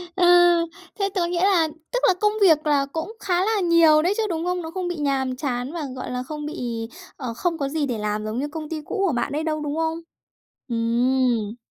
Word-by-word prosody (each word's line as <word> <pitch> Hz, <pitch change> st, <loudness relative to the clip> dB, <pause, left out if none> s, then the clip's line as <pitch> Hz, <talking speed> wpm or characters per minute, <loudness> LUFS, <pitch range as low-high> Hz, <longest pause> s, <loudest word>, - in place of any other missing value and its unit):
Ơ, 365 Hz, -, +2 dB, 0.7 s
thế 395 Hz, -, +1 dB
tớ 355 Hz, -3 st, +1 dB
nghĩa 350 Hz, +1 st, 0 dB
là 355 Hz, -5 st, +4 dB, 0.2 s
tức -, -, +1 dB
là 375 Hz, -, +5 dB
công 420 Hz, 0 st, +3 dB
việc 315 Hz, -5 st, +5 dB
là 285 Hz, -2 st, +3 dB
cũng 325 Hz, +7 st, -4 dB
khá 365 Hz, 0 st, +1 dB
là 435 Hz, -1 st, +1 dB
nhiều 335 Hz, -3 st, +5 dB
đấy 365 Hz, +5 st, +2 dB
chứ, 450 Hz, -, +1 dB
đúng 330 Hz, -1 st, -2 dB
không? 360 Hz, 0 st, -1 dB
Nó 320 Hz, -, -6 dB
không 365 Hz, +1 st, -3 dB
bị 350 Hz, -, -3 dB
nhàm 270 Hz, -3 st, -1 dB
chán 250 Hz, -1 st, -3 dB
và, 335 Hz, -3 st, -4 dB
gọi 255 Hz, -, -5 dB
là, 250 Hz, 0 st, -2 dB
không 300 Hz, +3 st, -6 dB
bị, 235 Hz, -6 st, -4 dB, 0.3 s
ờ, 245 Hz, -4 st, -5 dB
không 335 Hz, +6 st, -1 dB
có 275 Hz, -, -1 dB
gì 300 Hz, 0 st, -1 dB
để 245 Hz, -4 st, -2 dB
làm 210 Hz, 0 st, -2 dB
giống 215 Hz, +2 st, -3 dB
như 285 Hz, +3 st, -2 dB
công 310 Hz, 0 st, -6 dB
ty 315 Hz, -1 st, -4 dB
cũ 390 Hz, +6 st, -2 dB
của 345 Hz, -, +1 dB
bạn 240 Hz, +1 st, -1 dB
ấy 305 Hz, +2 st, -2 dB
đâu, 310 Hz, -1 st, -1 dB
đúng 295 Hz, 0 st, -3 dB
không? 325 Hz, 0 st, -1 dB, 0.7 s
Ừm. 235 Hz, -1 st, +1 dB
305 Hz, 235 wpm, -23 LUFS, 255-345 Hz, 0.7 s, là